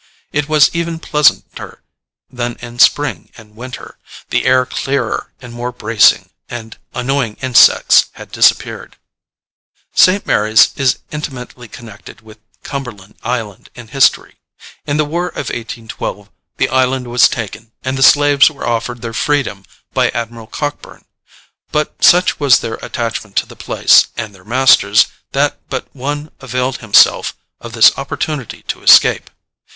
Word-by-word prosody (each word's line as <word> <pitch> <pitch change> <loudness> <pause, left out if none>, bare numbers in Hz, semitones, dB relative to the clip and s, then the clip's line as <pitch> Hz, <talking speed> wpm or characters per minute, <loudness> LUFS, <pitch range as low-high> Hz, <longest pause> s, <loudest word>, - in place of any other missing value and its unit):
It 150 0 -2
was 155 -2 +4
even 170 -1 -3
pleasanter 150 -5 -1 0.4
than 120 -1 -5
in 120 0 -11
spring 135 - +2
and 105 -2 -17
winter, 125 +2 -10 0.3
the - - 0
air 130 0 +3
clearer 140 +2 -3
and 120 -2 -12
more 120 +1 -5
bracing, - - +2 0.2
and 115 -2 -8 0.2
annoying 125 -3 -2
insects 130 -2 +4
had - - -13
disappeared. - - 0 1.0
St. 190 +2 +4
Mary's 110 +1 +3
is 135 -2 +1
intimately 130 -5 -8
connected 110 -2 -13
with 110 -1 -17 0.2
Cumberland 115 -8 -8
Island 115 -5 -5
in 120 -2 -12
history. 135 +2 +1 0.5
In 145 - -1
the 155 - +1
war 170 +4 -3
of - - -6
1812 115 -1 -7 0.3
the - - 0
island 130 0 0
was 120 0 +4
taken, 115 0 -7
and 130 0 -3
the 135 - -4
slaves 145 +1 +5
were 145 -3 -9
offered 120 +1 -3
their 115 -1 -5
freedom 120 -8 -2 0.3
by - - +1
Admiral 115 -1 -6
Cockburn; 145 +4 -6 0.7
but 150 0 -3
such 180 0 +4
was 140 -4 +4
their 110 - -5
attachment 115 -3 -5
to - - +1
the - - -15
place - - +3
and 110 -2 -5
their 95 -2 -18
masters 130 +4 +4 0.3
that - - 0
but - - -5
one 145 +3 -5
availed 130 0 -3
himself 110 -3 +3 0.2
of - - -10
this - - +5
opportunity 145 -7 -5
to - - -6
escape. - - +5
125 Hz, 140 wpm, -15 LUFS, 115-140 Hz, 1.0 s, slaves